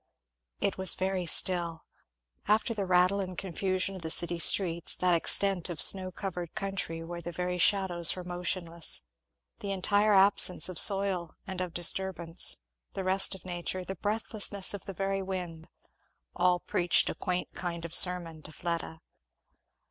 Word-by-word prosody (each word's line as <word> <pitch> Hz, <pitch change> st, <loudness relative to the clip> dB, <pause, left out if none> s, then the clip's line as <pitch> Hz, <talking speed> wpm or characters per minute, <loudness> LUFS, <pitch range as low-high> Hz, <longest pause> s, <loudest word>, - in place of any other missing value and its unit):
It 195 Hz, -, -2 dB
was 190 Hz, -2 st, +4 dB
very 185 Hz, -1 st, -3 dB
still; 170 Hz, -1 st, 0 dB, 0.6 s
after 215 Hz, +3 st, +1 dB
the 200 Hz, -3 st, -4 dB
rattle 180 Hz, +2 st, +2 dB
and 185 Hz, -2 st, -6 dB
confusion 190 Hz, +1 st, -3 dB
of 185 Hz, -, -9 dB
the 160 Hz, -, -5 dB
city 175 Hz, +1 st, 0 dB
streets, 170 Hz, -1 st, +4 dB
that 180 Hz, -1 st, +1 dB
extent 185 Hz, +2 st, +2 dB
of 170 Hz, -3 st, -7 dB
snow 185 Hz, -1 st, +5 dB
covered 180 Hz, -2 st, -7 dB
country 195 Hz, -4 st, -5 dB
where 170 Hz, +1 st, -8 dB
the 175 Hz, -, -7 dB
very 180 Hz, +1 st, -4 dB
shadows 180 Hz, -3 st, +1 dB
were 180 Hz, -, -8 dB
motionless 175 Hz, -, -3 dB, 0.6 s
the 200 Hz, -, -5 dB
entire 205 Hz, +2 st, +1 dB
absence 190 Hz, -1 st, +4 dB
of 180 Hz, -, 0 dB
soil 195 Hz, -4 st, +2 dB
and 190 Hz, -2 st, -6 dB
of 180 Hz, -2 st, -6 dB
disturbance 175 Hz, -, +3 dB, 0.3 s
the 190 Hz, -, -5 dB
rest 190 Hz, +1 st, +3 dB
of 190 Hz, -, -16 dB
nature 180 Hz, +1 st, -5 dB
the 190 Hz, -, -5 dB
breathlessness 205 Hz, 0 st, -1 dB
of 200 Hz, -, -8 dB
the 195 Hz, -, -7 dB
very 195 Hz, +1 st, -2 dB
wind 180 Hz, -4 st, -7 dB, 0.7 s
all 180 Hz, 0 st, +2 dB
preached 175 Hz, -1 st, +1 dB
a -, -, -2 dB
quaint 180 Hz, 0 st, -4 dB
kind 170 Hz, -2 st, -6 dB
of 170 Hz, -, -9 dB
sermon 175 Hz, -3 st, +2 dB
to 155 Hz, -, -12 dB
Fleda. 165 Hz, -1 st, -5 dB
180 Hz, 155 wpm, -28 LUFS, 170-195 Hz, 0.7 s, snow